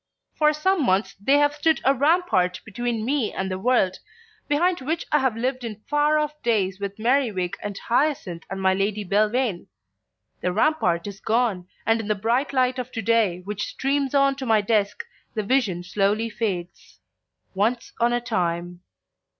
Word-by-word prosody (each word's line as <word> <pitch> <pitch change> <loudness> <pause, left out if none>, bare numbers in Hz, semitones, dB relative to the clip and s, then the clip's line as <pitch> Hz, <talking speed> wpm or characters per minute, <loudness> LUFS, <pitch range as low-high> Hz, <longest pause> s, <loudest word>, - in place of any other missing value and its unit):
For 300 -1 +3
some 320 +3 +1
months 195 -2 +1
they 275 +7 +4
have 290 0 +3
stood 315 +2 +2
a 270 - +5
rampart 275 - +2
between 230 +1 -3
me 265 -3 0
and 190 0 -3
the 185 - -3
world, 200 -4 +2 0.5
behind 345 +3 +1
which 320 +5 -2
I 300 - +4
have 260 -4 0
lived 255 +2 -2
in 215 -3 -6
far 295 +1 +2
off 300 0 -2
days 200 -5 0
with 200 0 -5
Merriwig 225 -6 +1
and 205 -1 -5
Hyacinth 235 - 0
and 195 - -4
my 190 0 +3
Lady 205 +2 -1
Belvane. 210 +1 +1 0.7
The 180 - -1
rampart 185 - +1
is 200 -1 -7
gone, 215 -6 0 0.2
and 225 +1 +2
in 210 - -7
the 210 - +1
bright 235 +7 0
light 255 -1 +1
of 250 0 -5
to 225 - -3
day 210 -5 +2
which 205 +2 -4
streams 275 0 -1
on 275 0 +4
to 270 - -5
my 220 -1 +4
desk 210 - 0 0.3
the 215 - -1
vision 205 -7 +1
slowly 205 +5 0
fades. 185 -6 -4 0.6
Once 225 +5 -1
on 235 0 +3
a 240 - +1
time 175 -6 -2
225 Hz, 175 wpm, -24 LUFS, 195-270 Hz, 0.7 s, a